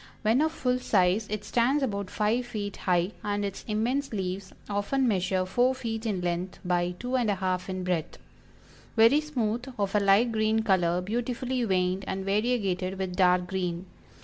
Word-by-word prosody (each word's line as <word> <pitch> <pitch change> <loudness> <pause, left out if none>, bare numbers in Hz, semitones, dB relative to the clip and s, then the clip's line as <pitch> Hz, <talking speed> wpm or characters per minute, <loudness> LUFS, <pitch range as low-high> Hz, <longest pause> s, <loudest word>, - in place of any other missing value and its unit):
When 225 +6 +3
of 315 0 +2
full 250 -5 0
size 200 -2 +2
it 210 0 -4
stands 250 +7 +2
about 200 -6 -2
five 225 +4 0
feet 205 -4 -4
high, 180 0 +1
and 205 0 -1
its 200 -1 -5
immense 240 +6 0
leaves 190 -2 -4 0.2
often 210 +6 0
measure 185 -3 +1
four 245 +7 +2
feet 225 -3 -4
in 195 -4 -1
length 175 +1 -2
by 175 0 0
two 250 +6 -3
and 240 -4 +2
a 205 - +2
half 185 0 -2
in 185 -1 -3
breadth; 180 -4 -2 0.8
very 230 +6 +6
smooth, 245 -6 -2
of 200 -2 -1
a 210 - +4
light 200 +4 +4
green 220 0 +1
color, 180 -4 +2
beautifully 245 +5 -2
veined 185 -1 +1
and 190 0 -3
variegated 195 -3 0
with 190 -1 -3
dark 180 -1 +4
green. 180 -1 -3
205 Hz, 175 wpm, -28 LUFS, 185-235 Hz, 0.8 s, very